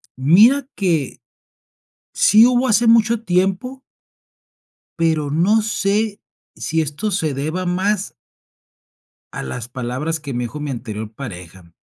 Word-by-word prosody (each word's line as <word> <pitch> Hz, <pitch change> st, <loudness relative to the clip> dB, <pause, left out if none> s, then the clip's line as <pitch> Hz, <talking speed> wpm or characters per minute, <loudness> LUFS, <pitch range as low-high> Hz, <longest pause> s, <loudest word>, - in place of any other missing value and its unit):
Mira 215 Hz, -, +4 dB
que, 165 Hz, -8 st, -1 dB, 0.9 s
sí 215 Hz, +3 st, +6 dB
hubo 250 Hz, +1 st, +2 dB
hace 235 Hz, 0 st, +3 dB
mucho 230 Hz, 0 st, +3 dB
tiempo 195 Hz, +8 st, -1 dB, 1.2 s
pero, 160 Hz, -3 st, 0 dB
no 195 Hz, +8 st, +3 dB
sé, 210 Hz, 0 st, -1 dB, 0.3 s
si 160 Hz, 0 st, -1 dB
esto 155 Hz, +8 st, -3 dB
se 160 Hz, -6 st, -1 dB
deba 155 Hz, +7 st, -3 dB
más 190 Hz, +3 st, -1 dB, 1.2 s
a -, -, -5 dB
las 110 Hz, -, -6 dB
palabras 130 Hz, +6 st, -4 dB
que 145 Hz, -2 st, -7 dB
me 120 Hz, 0 st, -2 dB
dijo 135 Hz, +6 st, -6 dB
mi 150 Hz, -, -4 dB
anterior 110 Hz, -4 st, -6 dB
pareja. 90 Hz, -8 st, -10 dB
165 Hz, 120 wpm, -19 LUFS, 135-210 Hz, 1.2 s, sí